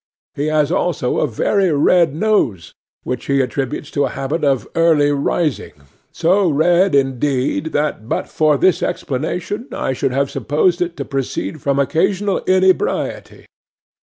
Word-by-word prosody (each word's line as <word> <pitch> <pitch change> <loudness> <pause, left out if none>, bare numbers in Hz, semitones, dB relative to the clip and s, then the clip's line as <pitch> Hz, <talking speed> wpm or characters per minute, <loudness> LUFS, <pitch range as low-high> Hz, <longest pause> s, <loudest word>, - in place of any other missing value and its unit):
He 145 +2 -2
has 155 0 +1
also 175 -8 0
a - - +1
very 185 - +1
red 155 +1 +3
nose, 145 - 0 0.3
which 125 - -4
he 140 0 +2
attributes 135 +3 -3
to 140 - +1
a - - -2
habit 150 +4 -3
of 135 -6 +1
early 160 -3 +3
rising—so 160 - -1
red, 175 +4 +3
indeed, 135 +2 0
that 145 -7 -2
but - - -2
for 155 -2 +2
this 185 +4 +2
explanation 180 - -3
I 135 - -2
should 135 +1 -1
have 140 +2 -1
supposed 170 +5 0
it 175 -1 -2
to 140 - -4
proceed 135 +2 -4
from 140 0 0
occasional 190 +7 +1
inebriety. 185 - 0
150 Hz, 140 wpm, -18 LUFS, 135-175 Hz, 0.3 s, red